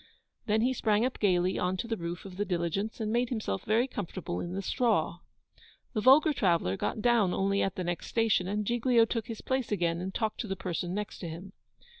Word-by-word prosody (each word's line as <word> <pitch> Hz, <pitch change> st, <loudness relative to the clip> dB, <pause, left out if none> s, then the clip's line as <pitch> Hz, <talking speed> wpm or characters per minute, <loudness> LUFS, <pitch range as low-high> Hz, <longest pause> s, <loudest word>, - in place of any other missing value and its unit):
Then 215 Hz, +1 st, +2 dB
he 255 Hz, +3 st, +2 dB
sprang 215 Hz, -2 st, +2 dB
up 260 Hz, -, -3 dB
gaily 185 Hz, -2 st, +2 dB
on 180 Hz, +1 st, 0 dB
to 230 Hz, -, -3 dB
the 230 Hz, -, -1 dB
roof 170 Hz, -1 st, -5 dB
of 190 Hz, -2 st, -9 dB
the 205 Hz, -, +1 dB
diligence, 190 Hz, +4 st, -2 dB
and 215 Hz, -1 st, -1 dB
made 240 Hz, 0 st, +1 dB
himself 215 Hz, -, -2 dB
very 225 Hz, +4 st, +2 dB
comfortable 185 Hz, -, -4 dB
in 175 Hz, -, -4 dB
the 195 Hz, -, -2 dB
straw. 200 Hz, -, +1 dB, 0.7 s
The 215 Hz, -, 0 dB
vulgar 295 Hz, +6 st, +6 dB
traveller 170 Hz, -, +1 dB
got 210 Hz, -, -3 dB
down 230 Hz, -7 st, +3 dB
only 200 Hz, +1 st, +1 dB
at 195 Hz, -, 0 dB
the 185 Hz, -, -3 dB
next 175 Hz, 0 st, -3 dB
station, 225 Hz, -5 st, +2 dB
and 210 Hz, +2 st, -1 dB
Giglio 240 Hz, +1 st, +3 dB
took 230 Hz, -1 st, -3 dB
his 225 Hz, -2 st, -6 dB
place 260 Hz, -3 st, -1 dB
again, 170 Hz, -4 st, 0 dB
and 190 Hz, +1 st, -3 dB
talked 215 Hz, +2 st, -2 dB
to 225 Hz, -, -3 dB
the 195 Hz, -, -2 dB
person 180 Hz, -1 st, -3 dB
next 210 Hz, 0 st, -4 dB
to 170 Hz, -, -5 dB
him. 180 Hz, +5 st, -8 dB
205 Hz, 220 wpm, -30 LUFS, 180-230 Hz, 0.7 s, vulgar